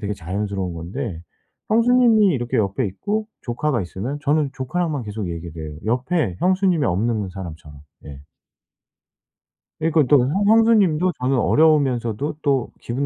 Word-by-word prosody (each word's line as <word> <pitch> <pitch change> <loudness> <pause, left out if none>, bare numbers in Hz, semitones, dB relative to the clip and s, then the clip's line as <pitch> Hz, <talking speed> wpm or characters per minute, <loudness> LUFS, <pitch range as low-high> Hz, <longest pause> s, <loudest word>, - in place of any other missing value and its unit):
되게 105 -1 -3
자연스러운 95 0 -4
건데 90 +2 -5 0.5
형수님이 230 -2 +4
이렇게 120 -2 -2
옆에 105 +4 0
있고 210 - -3
조카가 120 0 -1
있으면 105 +11 -5
저는 150 -1 +1
조카랑만 150 0 -2
계속 105 -3 -5
얘기를 85 -1 -7
해요 75 - -10
옆에 125 - 0
형수님이 185 -4 +2
없는 105 +2 0
사람처럼. 80 -6 -9 0.3
예. 70 -1 -10 1.6
그러니까 160 -1 +3
또 145 - +6
형 195 +9 0
형수님도 205 -6 +4
저는 130 +1 +1
어려우면서도 140 -4 +2
또 135 -4 0
기분 130 +4 -3
130 Hz, 335 characters per minute, -21 LUFS, 100-160 Hz, 1.6 s, 또